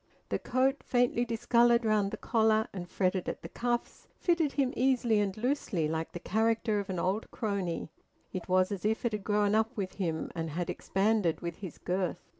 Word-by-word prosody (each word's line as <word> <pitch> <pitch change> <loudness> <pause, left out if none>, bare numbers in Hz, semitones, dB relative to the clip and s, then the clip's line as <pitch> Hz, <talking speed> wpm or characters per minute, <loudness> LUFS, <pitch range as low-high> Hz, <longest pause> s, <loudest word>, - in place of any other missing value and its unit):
The - - 0
coat, 265 +3 +1
faintly 245 -1 +2
discoloured 235 0 +3
round 210 -2 +2
the - - -5
collar 220 -1 +2
and 175 -2 -6
fretted 185 0 0
at - - -6
the - - -7
cuffs, 240 0 -3
fitted 335 -5 +1
him 270 -3 +1
easily 245 -4 +3
and 200 -1 -1
loosely 230 - 0
like 160 +1 -2
the 175 - -6
character 220 +2 +1
of 200 - -5
an 185 - -2
old 190 +5 -1
crony; 190 -7 -3 0.4
it 185 0 -5
was 185 +1 +3
as 200 -3 -4
if 220 +3 0
it 235 - +2
had 210 -2 -3
grown 205 0 +2
up 220 +3 +1
with 190 -2 -3
him, 160 -3 -2
and 165 -1 -3
had 170 +3 -2
expanded 195 -3 +1
with 170 -1 -4
his 185 -6 -8
girth. 180 -1 -1
210 Hz, 195 wpm, -30 LUFS, 185-235 Hz, 0.4 s, discoloured